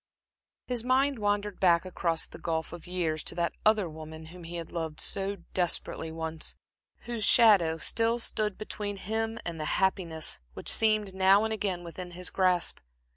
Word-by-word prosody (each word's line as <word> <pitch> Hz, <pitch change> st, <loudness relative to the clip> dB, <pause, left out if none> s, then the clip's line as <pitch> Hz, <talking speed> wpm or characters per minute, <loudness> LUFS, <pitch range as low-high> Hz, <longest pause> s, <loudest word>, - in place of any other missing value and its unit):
His 245 Hz, -2 st, -1 dB
mind 260 Hz, +1 st, +2 dB
wandered 205 Hz, -1 st, -1 dB
back 170 Hz, -2 st, +4 dB
across 170 Hz, -3 st, -1 dB
the -, -, -12 dB
gulf 160 Hz, -1 st, -3 dB
of 175 Hz, -1 st, -9 dB
years, 170 Hz, -4 st, -1 dB
to -, -, -3 dB
that 170 Hz, -1 st, 0 dB
other 215 Hz, -3 st, +3 dB
woman 160 Hz, 0 st, -9 dB
whom 180 Hz, -2 st, -11 dB
he 170 Hz, +1 st, -7 dB
had 170 Hz, -1 st, -6 dB
loved 160 Hz, -3 st, -4 dB
so 200 Hz, 0 st, 0 dB, 0.2 s
desperately 170 Hz, -2 st, 0 dB
once, 160 Hz, 0 st, -4 dB, 0.5 s
whose 235 Hz, -2 st, -4 dB
shadow 200 Hz, -8 st, +6 dB
still 230 Hz, +7 st, +1 dB
stood 215 Hz, -3 st, 0 dB
between 205 Hz, -1 st, -5 dB
him 225 Hz, +3 st, -2 dB
and 170 Hz, -2 st, -4 dB
the 155 Hz, -, -3 dB
happiness 175 Hz, -, 0 dB, 0.2 s
which -, -, -1 dB
seemed, 215 Hz, -3 st, +3 dB
now 190 Hz, +2 st, +5 dB
and 220 Hz, 0 st, 0 dB
again, 195 Hz, -5 st, -2 dB
within 175 Hz, +1 st, -7 dB
his 180 Hz, -, -2 dB
grasp. 185 Hz, -2 st, +1 dB
185 Hz, 170 wpm, -29 LUFS, 165-215 Hz, 0.5 s, shadow